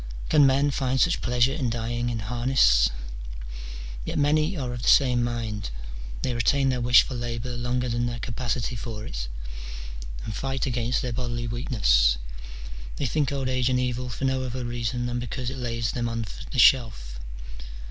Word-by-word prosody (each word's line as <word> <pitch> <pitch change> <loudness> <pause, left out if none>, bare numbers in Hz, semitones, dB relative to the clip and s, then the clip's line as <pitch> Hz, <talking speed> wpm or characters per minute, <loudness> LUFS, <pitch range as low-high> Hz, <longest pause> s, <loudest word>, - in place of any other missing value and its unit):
Can 145 -3 +6
men 140 +2 +3
find 130 -1 0
such 175 +3 +3
pleasure 125 +2 +2
in 135 -5 -1
dying 120 +1 -2
in 115 -2 -2
harness? 110 - +4 1.1
Yet - - -3
many 155 +5 +2
are 125 -4 -3
of 120 - -5
the - - -3
same 125 -3 +5
mind: 115 -4 -3 0.5
they 125 - 0
retain 135 +3 +2
their 125 -1 0
wish 120 0 +7
for - - -6
labour 120 0 -3
longer 125 +1 -1
than 120 0 0
their 120 0 -3
<;apacity 120 0 -2
for 110 -1 -6
it, - - -4 1.0
and 110 - -4
fight 135 +2 -2
against 125 -1 0
their 125 -2 -2
bodily 120 -1 -2
weakness; - - +3 0.8
they 145 - -2
think 145 +2 +1
old 135 -2 -1
age 130 -1 +1
an 125 - +2
evil 125 0 -1
for 125 +3 -3
no 130 0 +1
other 130 -1 -3
reason 120 +1 -2
than 120 0 -1
because 125 +1 -4
it 135 - -6
lays 115 -2 -1
them 120 -1 -1
on 115 -1 -2 0.2
the - - -5
shelf. 100 - +4
120 Hz, 175 wpm, -26 LUFS, 115-130 Hz, 1.1 s, wish